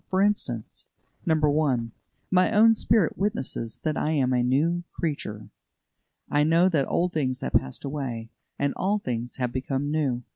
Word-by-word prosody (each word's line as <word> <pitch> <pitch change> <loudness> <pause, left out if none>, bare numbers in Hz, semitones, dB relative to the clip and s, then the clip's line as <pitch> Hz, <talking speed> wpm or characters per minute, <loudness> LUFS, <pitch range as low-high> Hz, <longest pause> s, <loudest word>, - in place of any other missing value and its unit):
For 185 - +1
instance: 125 - -1 0.4
1. 150 -7 +2 0.4
My 185 +2 +4
own 225 +1 +6
spirit 215 -5 +1
witnesses 190 - -2
that 155 -1 0
I 155 - 0
am 130 -4 +2
a 125 - +2
new 155 +8 +1
creature. 110 -10 -4 0.8
I 145 0 +2
know 165 +4 +4
that 150 -6 +1
old 180 +1 0
things 130 -5 -1
have - - -4
passed 65 - 0
away, 130 -6 -4 0.3
and 140 0 0
all 200 +3 +1
things 120 - -4
have 125 -2 -2
become 135 +2 -2
new. 135 -6 0
145 Hz, 155 wpm, -26 LUFS, 125-175 Hz, 0.8 s, own